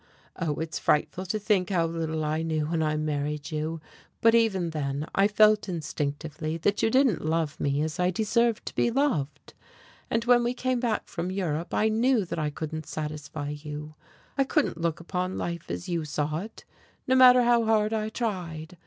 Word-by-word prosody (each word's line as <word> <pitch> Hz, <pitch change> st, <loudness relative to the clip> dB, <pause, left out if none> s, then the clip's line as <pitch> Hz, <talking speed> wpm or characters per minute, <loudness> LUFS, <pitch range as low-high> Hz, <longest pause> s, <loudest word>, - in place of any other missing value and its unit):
Oh, 160 Hz, -4 st, -2 dB
it 160 Hz, +1 st, -5 dB
is -, -, -2 dB
frightful 180 Hz, +5 st, +1 dB
to 215 Hz, -, -1 dB
think 205 Hz, -4 st, +1 dB
how 175 Hz, -4 st, +2 dB
little 160 Hz, -1 st, -2 dB
I 155 Hz, +1 st, 0 dB
knew 160 Hz, -2 st, -1 dB
when 160 Hz, +1 st, -1 dB
I 155 Hz, -1 st, +1 dB
married 150 Hz, 0 st, -2 dB
you, 155 Hz, +1 st, -2 dB, 0.4 s
but 230 Hz, 0 st, +5 dB
even 195 Hz, -7 st, +2 dB
then 145 Hz, -1 st, -2 dB
I 195 Hz, +1 st, +4 dB
felt 210 Hz, -1 st, +4 dB
instinctively 155 Hz, -1 st, -3 dB
that 200 Hz, +5 st, 0 dB
you -, -, +3 dB
didn't 260 Hz, -4 st, +3 dB
love 155 Hz, -1 st, -1 dB
me 140 Hz, +1 st, 0 dB
as 160 Hz, +3 st, -4 dB
I 180 Hz, 0 st, +3 dB
deserved 225 Hz, +4 st, +1 dB
to -, -, -5 dB
be -, -, +2 dB
loved. 235 Hz, -, -1 dB, 0.6 s
And 230 Hz, 0 st, 0 dB
when 240 Hz, 0 st, +5 dB
we 240 Hz, +1 st, -1 dB
came 255 Hz, 0 st, 0 dB
back 235 Hz, -3 st, -1 dB
from 180 Hz, -1 st, -4 dB
Europe 175 Hz, -4 st, -2 dB
I 215 Hz, -, +2 dB
knew 230 Hz, 0 st, +2 dB
that 170 Hz, -, -4 dB
I 150 Hz, -1 st, 0 dB
couldn't 155 Hz, +1 st, -5 dB
satisfy 150 Hz, -1 st, -5 dB
you, 150 Hz, +1 st, -7 dB, 0.5 s
I -, -, +6 dB
couldn't 270 Hz, -, 0 dB
look 170 Hz, -1 st, 0 dB
upon 180 Hz, +2 st, -3 dB
life 170 Hz, -1 st, -4 dB
as 175 Hz, -, -4 dB
you 170 Hz, -3 st, -1 dB
saw 150 Hz, +1 st, -2 dB
it, 215 Hz, +5 st, -9 dB, 0.4 s
no 260 Hz, -, +2 dB
matter 255 Hz, -1 st, +8 dB
how 235 Hz, -1 st, +4 dB
hard 215 Hz, 0 st, +2 dB
I 215 Hz, -1 st, -1 dB
tried. 180 Hz, -8 st, -4 dB
170 Hz, 190 wpm, -27 LUFS, 155-215 Hz, 0.6 s, matter